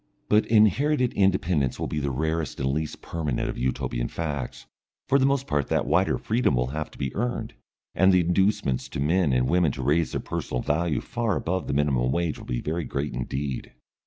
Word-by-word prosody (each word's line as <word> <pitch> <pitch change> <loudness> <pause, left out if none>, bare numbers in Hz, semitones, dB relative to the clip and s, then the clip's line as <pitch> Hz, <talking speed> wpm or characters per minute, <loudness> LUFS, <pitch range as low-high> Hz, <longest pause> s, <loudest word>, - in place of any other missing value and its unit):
But 105 0 +4
inherited 125 +5 +3
independence 90 -8 +1
will - - -1
be 75 - -2
the 70 -1 -1
rarest 80 +4 -2
and 65 0 0
least 75 +2 -3
permanent 75 -7 -2
of - - -4
Utopian - - -1
facts, 75 -5 -4 0.4
for 140 +1 +4
the 135 - +4
most 140 -1 +1
part 75 - 0
that - - +1
wider - - +2
freedom 110 - +1
will 60 +1 0
have 80 0 -3
to - - -16
be 65 -1 -3
earned, 120 +3 -2 0.4
and 95 +1 +5
the 90 -1 +5
inducements 90 -6 +1
to - - -5
men 80 +2 +2
and 65 0 +2
women 85 -2 +3
to 65 - -5
raise 75 +5 +1
their - - 0
personal 60 - -3
value 80 +2 0
far 115 -4 -1
above 95 +2 -2
the - - -1
minimum 70 -3 +1
wage 85 0 -1
will - - -11
be - - -2
very 80 +3 -2
great 70 +2 -3
indeed. 65 +2 -4
80 Hz, 200 wpm, -26 LUFS, 65-95 Hz, 0.4 s, and